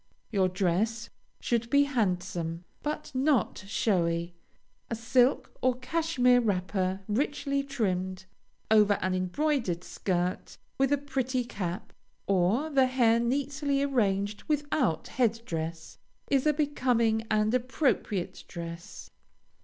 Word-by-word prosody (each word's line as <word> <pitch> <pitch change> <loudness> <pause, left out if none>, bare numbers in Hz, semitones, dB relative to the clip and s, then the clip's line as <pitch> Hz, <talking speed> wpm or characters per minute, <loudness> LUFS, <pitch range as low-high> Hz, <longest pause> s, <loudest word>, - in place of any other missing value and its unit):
Your 190 -4 +2
dress 200 +5 0 0.3
should 235 -1 -1
be 285 +2 +5
handsome, 180 - -1 0.2
but 300 0 -4
not 260 -6 +1
showy. 170 -5 0 0.6
A 230 - -1
silk 245 +3 +2
or 255 -1 +2
cashmere 255 -3 +2
wrapper, 190 -2 -1
richly 280 +4 0
trimmed, 190 -9 -2 0.5
over 210 -2 +6
an 185 -2 -1
embroidered 185 - 0
skirt, 180 -1 -2 0.2
with 270 0 +3
a 285 - +4
pretty 265 -2 -1
cap, 185 -6 -5 0.3
or 200 - +1
the 265 -2 +4
hair 235 -3 +3
neatly 280 +3 0
arranged 205 -6 0
without 290 - 0
head 230 -3 +1
dress, 165 -2 -5 0.3
is 275 +1 +3
a 300 - +4
becoming 250 -7 +1
and 215 +1 +2
appropriate 255 - 0
dress. 170 -1 -8
230 Hz, 115 wpm, -29 LUFS, 185-270 Hz, 0.6 s, over